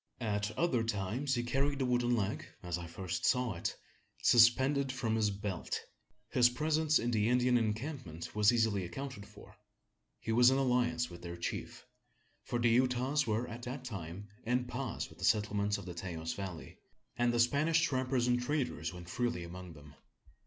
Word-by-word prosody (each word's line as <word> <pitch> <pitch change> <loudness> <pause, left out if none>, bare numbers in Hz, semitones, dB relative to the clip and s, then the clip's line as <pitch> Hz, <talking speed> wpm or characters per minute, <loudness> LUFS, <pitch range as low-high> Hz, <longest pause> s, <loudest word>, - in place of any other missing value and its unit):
At 105 -3 -1
other 140 -9 +2
times 115 +6 -1
he 120 - -1
carried 140 +3 0
the 135 - 0
wooden 120 -1 +2
leg, 105 -3 -2 0.2
as 90 -1 -2
I 85 - -7
first 85 +1 -4
saw 125 -3 +2
it, 85 - -3 0.5
suspended 130 +4 +5
from 120 -4 -1
his 110 -2 +2
belt! 100 -3 -3 0.5
His 120 -1 +5
presence 155 +4 +2
in 120 - -1
the 110 -1 +2
Indian 125 0 +3
encampment 115 - -2
was 105 0 +5
easily 110 -5 +2
accounted 115 +4 -6
for. - - -15 0.6
He 115 - -3
was 120 +2 +7
in 130 - +3
alliance 125 -2 +1
with 85 - -10
their 85 0 -6
chief: 85 - -5 0.6
for 120 - -2
the 120 0 +3
Utahs 130 +4 +2
were 110 +3 0
at 120 0 -7
that 125 +2 -6
time 95 -3 -6 0.2
en 125 +2 0
paz 125 +1 -4
with - - -17
the - - -7
settlements 105 -1 +2
of 100 - -9
the 90 - -6
Taos 85 -2 -4
Valley; 95 -4 -7 0.4
and 120 0 +2
the 120 - 0
Spanish 155 +7 +3
trappers 130 -5 +1
and 125 0 +2
traders 125 - -1
went 90 -1 -10
freely 105 -3 -1
among 90 0 -8
them. 75 -1 -14
120 Hz, 175 wpm, -33 LUFS, 100-125 Hz, 0.6 s, was